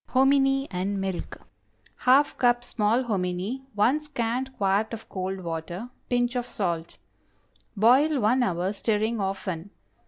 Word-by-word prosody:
HOMINY 270 Hz, +1 st, +3 dB
AND 195 Hz, +2 st, -2 dB
MILK. 190 Hz, -2 st, -4 dB
✠ -, -, -23 dB, 0.6 s
½ 275 Hz, +3 st, +5 dB
cup 240 Hz, -1 st, +3 dB
small 230 Hz, +1 st, +1 dB
hominy. 195 Hz, +2 st, -2 dB
1 240 Hz, +8 st, +3 dB
scant 260 Hz, -3 st, -3 dB
quart 200 Hz, +3 st, +1 dB
of 225 Hz, -, -13 dB
cold 190 Hz, 0 st, -4 dB
water. 170 Hz, +7 st, -5 dB, 0.2 s
Pinch 245 Hz, 0 st, +1 dB
of 245 Hz, -1 st, -2 dB
salt. 170 Hz, -7 st, -3 dB, 0.8 s
Boil 265 Hz, +8 st, +5 dB
one 240 Hz, +4 st, +3 dB
hour, 185 Hz, -3 st, 0 dB
stirring 220 Hz, +2 st, 0 dB
often. 190 Hz, -2 st, -3 dB
220 Hz, 130 wpm, -26 LUFS, 190-255 Hz, 0.8 s, ½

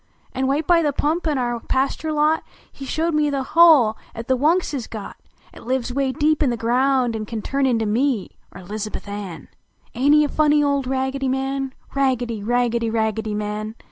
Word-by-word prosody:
An, 265 Hz, 0 st, -1 dB
wite 290 Hz, +3 st, 0 dB
by 345 Hz, 0 st, +4 dB
the 295 Hz, -3 st, +1 dB
pump 315 Hz, +5 st, -1 dB
in 300 Hz, -3 st, 0 dB
our 240 Hz, -2 st, -1 dB
pasture 275 Hz, +6 st, -1 dB
lot, 305 Hz, +1 st, +2 dB, 0.4 s
lie 270 Hz, -, -6 dB
showed 325 Hz, +3 st, -1 dB
me 300 Hz, -1 st, +2 dB
the 275 Hz, -2 st, -1 dB
hole 310 Hz, -10 st, +6 dB, 0.2 s
at 230 Hz, 0 st, -7 dB
the 260 Hz, -, +3 dB
"YVunks 315 Hz, +6 st, +1 dB
is 255 Hz, -5 st, -4 dB
got, 215 Hz, -3 st, -8 dB, 0.4 s
At -, -, -13 dB
lives 255 Hz, -1 st, -1 dB
"way 270 Hz, 0 st, 0 dB
deep 300 Hz, +4 st, +1 dB
in 285 Hz, -, +3 dB
the 240 Hz, -, -1 dB
ground, 250 Hz, +1 st, +1 dB
an 215 Hz, -1 st, -4 dB
can 220 Hz, -2 st, -5 dB
Turn 275 Hz, 0 st, 0 dB
into 230 Hz, -3 st, +1 dB
me, 230 Hz, 0 st, 0 dB, 0.2 s
er -, -, -10 dB
Lizahuth 210 Hz, +3 st, -6 dB
Ann! 200 Hz, -7 st, -7 dB, 0.5 s
Aint 275 Hz, +5 st, +3 dB
he 300 Hz, -, +5 dB
a -, -, +1 dB
funny 295 Hz, 0 st, +3 dB
old 280 Hz, -2 st, 0 dB
Raggedy 265 Hz, +1 st, -1 dB
Man? 270 Hz, 0 st, -2 dB, 0.2 s
Raggedy! 250 Hz, -5 st, 0 dB
Raggedy! 235 Hz, +1 st, 0 dB
Raggedv 220 Hz, -1 st, -1 dB
Man! 210 Hz, +1 st, -4 dB
260 Hz, 195 wpm, -21 LUFS, 225-290 Hz, 0.5 s, hole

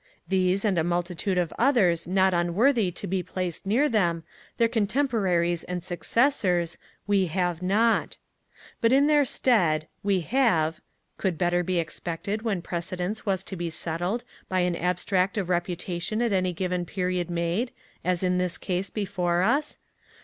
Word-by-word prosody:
These, 190 Hz, +1 st, +1 dB
and 190 Hz, -5 st, +2 dB
a -, -, +2 dB
multitude 175 Hz, +2 st, -1 dB
of 175 Hz, -3 st, 0 dB
others 200 Hz, -, +3 dB
not 190 Hz, +1 st, +3 dB
unworthy 195 Hz, +6 st, +2 dB
to 175 Hz, -, -6 dB
be 185 Hz, +1 st, -1 dB
placed 180 Hz, 0 st, -4 dB
near 250 Hz, +9 st, +3 dB
them, 175 Hz, -, +1 dB, 0.3 s
their 230 Hz, -, +4 dB
contemporaries 205 Hz, -, +1 dB
and 180 Hz, -1 st, -4 dB
successors, 180 Hz, -, +1 dB, 0.3 s
we 200 Hz, -2 st, +2 dB
have 175 Hz, 0 st, -1 dB
not. 215 Hz, +5 st, +2 dB, 0.6 s
But 230 Hz, -, +4 dB
in 275 Hz, +2 st, +5 dB
their 295 Hz, -1 st, +4 dB
stead, 175 Hz, -13 st, +2 dB
we 200 Hz, -2 st, +1 dB
have 165 Hz, -, +1 dB, 0.4 s
(could 185 Hz, -5 st, -1 dB
better 175 Hz, +1 st, +2 dB
be 180 Hz, +1 st, -1 dB
expected 170 Hz, +5 st, -3 dB
when 205 Hz, -6 st, -2 dB
precedence 180 Hz, +5 st, -4 dB
was 190 Hz, -1 st, 0 dB
to 195 Hz, -, -6 dB
be 170 Hz, -1 st, -3 dB
settled 175 Hz, +8 st, -2 dB, 0.3 s
by 185 Hz, -1 st, +1 dB
an 180 Hz, -1 st, +1 dB
abstract 180 Hz, +3 st, 0 dB
of 190 Hz, -3 st, -1 dB
reputation 175 Hz, +2 st, -2 dB
at 235 Hz, -4 st, +1 dB
any 185 Hz, -1 st, +1 dB
given 180 Hz, 0 st, -2 dB
period 180 Hz, -1 st, -2 dB
made, 175 Hz, +8 st, -1 dB, 0.3 s
as 180 Hz, 0 st, 0 dB
in 180 Hz, 0 st, +2 dB
this 180 Hz, -1 st, -1 dB
case 185 Hz, +1 st, -2 dB
before 180 Hz, -4 st, 0 dB
us?) 280 Hz, +9 st, +1 dB
185 Hz, 155 wpm, -26 LUFS, 175-205 Hz, 0.6 s, in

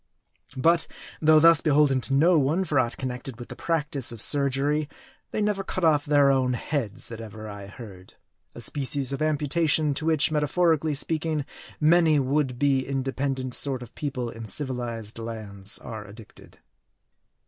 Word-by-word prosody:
But, 165 Hz, +5 st, +3 dB, 0.3 s
though 155 Hz, 0 st, +6 dB
thus 165 Hz, 0 st, +6 dB
beholden 145 Hz, -3 st, +3 dB
to 135 Hz, -, -3 dB
no 165 Hz, +4 st, +4 dB
one 155 Hz, +7 st, 0 dB
for 150 Hz, -4 st, +1 dB
aught 120 Hz, -1 st, -1 dB
connected 125 Hz, -1 st, -5 dB
with 120 Hz, -, -9 dB
the -, -, -8 dB
practice 150 Hz, -6 st, 0 dB
of 115 Hz, -, -8 dB
surgery, 145 Hz, +3 st, +2 dB, 0.4 s
they -, -, -3 dB
never 205 Hz, -2 st, 0 dB
cut 185 Hz, -1 st, -4 dB
off 150 Hz, -2 st, +3 dB
their 145 Hz, -2 st, +4 dB
own 130 Hz, -2 st, +1 dB
heads, 120 Hz, -3 st, -2 dB
that 115 Hz, -1 st, -8 dB
ever 110 Hz, 0 st, -9 dB
I 100 Hz, -1 st, -9 dB
heard; 100 Hz, -4 st, -12 dB, 0.4 s
a -, -, -7 dB
species 140 Hz, -1 st, +1 dB
of 135 Hz, -, -4 dB
amputa 155 Hz, +1 st, 0 dB
tion 150 Hz, -1 st, +3 dB
to 155 Hz, +3 st, -3 dB
which, 155 Hz, -2 st, +3 dB
metaphorically 155 Hz, 0 st, +1 dB
speaking, 155 Hz, 0 st, -1 dB, 0.3 s
many 160 Hz, 0 st, +4 dB
would 135 Hz, -1 st, 0 dB
be 140 Hz, 0 st, +2 dB
in 135 Hz, 0 st, -3 dB
dependent 130 Hz, -1 st, -3 dB
sort 130 Hz, -2 st, -1 dB
of 120 Hz, -, -14 dB
people 130 Hz, -5 st, -4 dB
in 115 Hz, 0 st, -9 dB
civilized 115 Hz, -2 st, -3 dB
lands 105 Hz, -4 st, -2 dB
are 110 Hz, -3 st, -8 dB
addicted. 105 Hz, +2 st, -15 dB
140 Hz, 165 wpm, -25 LUFS, 120-155 Hz, 0.4 s, though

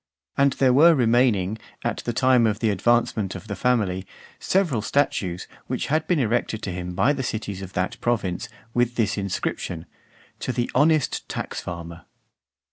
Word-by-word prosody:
And 140 Hz, -1 st, +3 dB
there 130 Hz, -1 st, +3 dB
were 160 Hz, +5 st, +7 dB
remaining, 115 Hz, -5 st, +2 dB, 0.2 s
at -, -, -1 dB
the 120 Hz, -, -3 dB
time 125 Hz, 0 st, +4 dB
of 105 Hz, -1 st, 0 dB
the 110 Hz, -1 st, +1 dB
advancement 110 Hz, -2 st, +1 dB
of 95 Hz, +3 st, -9 dB
the 100 Hz, -, -4 dB
family, 95 Hz, -5 st, 0 dB, 0.3 s
several 170 Hz, -, +1 dB
statues, 100 Hz, -7 st, 0 dB, 0.2 s
which -, -, -2 dB
had 155 Hz, 0 st, +1 dB
been 180 Hz, -, +2 dB
erected 115 Hz, -3 st, 0 dB
to 95 Hz, -, -3 dB
him 90 Hz, 0 st, -5 dB
by 115 Hz, +10 st, +3 dB
the 140 Hz, -, -3 dB
cities 105 Hz, -5 st, -4 dB
of 95 Hz, -1 st, -8 dB
that 90 Hz, 0 st, -2 dB
province, 105 Hz, -7 st, -1 dB, 0.2 s
with 120 Hz, 0 st, +1 dB
this 110 Hz, -4 st, +1 dB
inscription: 90 Hz, -4 st, -3 dB, 0.5 s
"To -, -, -2 dB
the 120 Hz, -1 st, -2 dB
honest 150 Hz, +1 st, +2 dB
Tax -, -, -4 dB
farmer." 85 Hz, -1 st, -7 dB
115 Hz, 165 wpm, -24 LUFS, 95-130 Hz, 0.5 s, were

